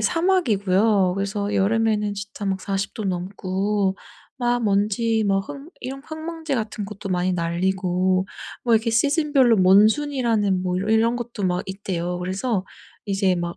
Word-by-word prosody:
사막이고요. 215 Hz, -, +2 dB
그래서 200 Hz, +1 st, -2 dB
여름에는 210 Hz, 0 st, +1 dB
진짜 200 Hz, 0 st, -6 dB
막 190 Hz, 0 st, 0 dB
40 195 Hz, -1 st, -3 dB
도 215 Hz, -, -5 dB
넘고 190 Hz, +2 st, -1 dB, 0.4 s
막 240 Hz, -1 st, 0 dB
먼지 215 Hz, +2 st, +1 dB
막 195 Hz, 0 st, +2 dB
흙 290 Hz, +2 st, -9 dB
이런 265 Hz, +2 st, -6 dB
흙먼지 320 Hz, -1 st, -5 dB
같은 215 Hz, -3 st, -3 dB
것도 200 Hz, -1 st, -8 dB
많이 180 Hz, 0 st, +1 dB
날리고 185 Hz, +2 st, 0 dB, 0.4 s
뭐 235 Hz, -2 st, +4 dB
이렇게 225 Hz, +1 st, +2 dB
시즌별로 280 Hz, -1 st, +3 dB
몬순이라는 215 Hz, 0 st, +3 dB
뭐 180 Hz, -1 st, -1 dB
이 215 Hz, +3 st, +1 dB
이런 230 Hz, +2 st, +2 dB
것도 235 Hz, -4 st, -5 dB
막 180 Hz, 0 st, 0 dB
있대요. 180 Hz, -3 st, -3 dB
그래서 190 Hz, +3 st, -2 dB, 0.4 s
이제 195 Hz, -2 st, +1 dB
막 175 Hz, 0 st, -4 dB
205 Hz, 290 characters per minute, -23 LUFS, 190-235 Hz, 0.4 s, 뭐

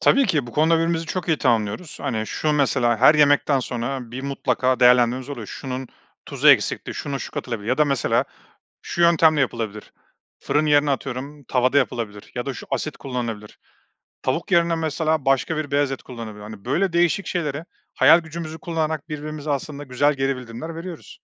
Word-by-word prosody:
Tabii 275 Hz, -1 st, +4 dB
ki 145 Hz, -6 st, 0 dB
bu 120 Hz, -, -10 dB
konuda 160 Hz, +2 st, +3 dB
birbirimizi 165 Hz, 0 st, 0 dB
çok 180 Hz, 0 st, -4 dB
iyi 160 Hz, -, +2 dB
tamamlıyoruz. 115 Hz, -, -1 dB
Hani, 110 Hz, -6 st, -2 dB
şu 155 Hz, -1 st, -1 dB
mesela 120 Hz, -4 st, +2 dB
her 150 Hz, -, +6 dB
yemekten 145 Hz, -2 st, +4 dB
sonra 125 Hz, 0 st, -4 dB
bir 130 Hz, +2 st, -6 dB
mutlaka 130 Hz, -2 st, 0 dB
değerlendirmemiz 125 Hz, +1 st, +4 dB
oluyor. 120 Hz, -7 st, -6 dB
Şunun 130 Hz, -1 st, -6 dB, 0.4 s
tuzu -, -, +2 dB
eksikti, -, -, +3 dB
şuna 140 Hz, -2 st, -4 dB
şu -, -, -6 dB
katılabilir 115 Hz, -3 st, -5 dB
ya 130 Hz, -, +1 dB
da 150 Hz, -, +5 dB
mesela 140 Hz, -3 st, +1 dB, 0.6 s
şu 170 Hz, -, -3 dB
yöntemle 160 Hz, -3 st, +5 dB
yapılabilir. 110 Hz, -4 st, -3 dB, 0.5 s
Fırın 150 Hz, +2 st, 0 dB
yerine 145 Hz, -1 st, +4 dB
atıyorum 135 Hz, +2 st, -5 dB
tavada 130 Hz, +2 st, +1 dB
yapılabilir 115 Hz, -6 st, -2 dB
ya 120 Hz, -, -3 dB
da 135 Hz, -, -3 dB
şu -, -, -10 dB
asit 155 Hz, -, -2 dB
kullanılabilir. 115 Hz, -5 st, -5 dB, 0.6 s
Tavuk 165 Hz, +9 st, -2 dB
yerine 170 Hz, -1 st, +3 dB
mesela 160 Hz, -1 st, -1 dB
başka 135 Hz, +4 st, +1 dB
bir 150 Hz, -2 st, -4 dB
beyaz 145 Hz, -1 st, +2 dB
et 135 Hz, -, -5 dB
kullanabilir. 110 Hz, -4 st, -8 dB
Hani, 105 Hz, -1 st, -10 dB
böyle 170 Hz, +7 st, 0 dB
değişik 175 Hz, +3 st, +2 dB
şeylere 155 Hz, -2 st, -3 dB, 0.3 s
hayal 165 Hz, -, +7 dB
gücümüzü 160 Hz, 0 st, -7 dB
kullanarak 160 Hz, -2 st, -3 dB
birbirimize 150 Hz, 0 st, -6 dB
aslında 145 Hz, +1 st, -4 dB
güzel 145 Hz, +3 st, +1 dB
geri 135 Hz, -1 st, -1 dB
bildirimler 125 Hz, +7 st, -7 dB
veriyoruz. 170 Hz, 0 st, -9 dB
140 Hz, 170 wpm, -22 LUFS, 125-155 Hz, 0.6 s, hayal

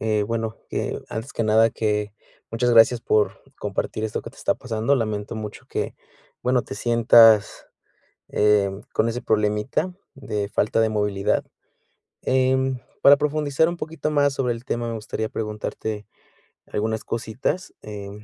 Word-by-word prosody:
eh, 110 Hz, -1 st, +1 dB
bueno, 115 Hz, 0 st, -3 dB, 0.5 s
antes 115 Hz, +5 st, -5 dB
que 115 Hz, -, -1 dB
nada 110 Hz, +1 st, +4 dB
que 105 Hz, -2 st, -1 dB, 0.4 s
muchas 120 Hz, +2 st, +1 dB
gracias 115 Hz, +1 st, +6 dB
por 105 Hz, -2 st, +1 dB, 0.2 s
compartir 110 Hz, -, -3 dB
esto 110 Hz, -1 st, -2 dB
que -, -, -7 dB
te -, -, -22 dB
está -, -, 0 dB
pasando. 115 Hz, +3 st, 0 dB
Lamento 110 Hz, -2 st, -3 dB
mucho 105 Hz, -1 st, -7 dB
que, -, -, -3 dB, 0.5 s
bueno, 125 Hz, 0 st, +2 dB
te -, -, -8 dB
sientas, 115 Hz, -2 st, +5 dB, 0.6 s
eh, 105 Hz, -2 st, +3 dB, 0.2 s
con 115 Hz, -, +2 dB
ese 120 Hz, +2 st, -3 dB
problemita 105 Hz, -, 0 dB, 0.2 s
de 105 Hz, -7 st, -3 dB
falta 110 Hz, +2 st, +1 dB
de 110 Hz, -1 st, +3 dB
movilidad. 105 Hz, -2 st, 0 dB, 0.8 s
Em, 130 Hz, 0 st, +2 dB, 0.2 s
para 140 Hz, +1 st, +9 dB
profundizar 150 Hz, +1 st, +1 dB
un 175 Hz, -, -3 dB
poquito 160 Hz, -2 st, -4 dB
más 145 Hz, -1 st, +3 dB
sobre 125 Hz, -3 st, 0 dB
el 115 Hz, +1 st, -10 dB
tema, 120 Hz, -2 st, -2 dB
me 115 Hz, -, -3 dB
gustaría 110 Hz, 0 st, -4 dB
preguntarte 105 Hz, 0 st, -4 dB, 0.6 s
algunas 110 Hz, +1 st, -2 dB
cositas. 120 Hz, -, -3 dB
Eh 100 Hz, -2 st, -7 dB
115 Hz, 145 wpm, -23 LUFS, 105-130 Hz, 0.8 s, para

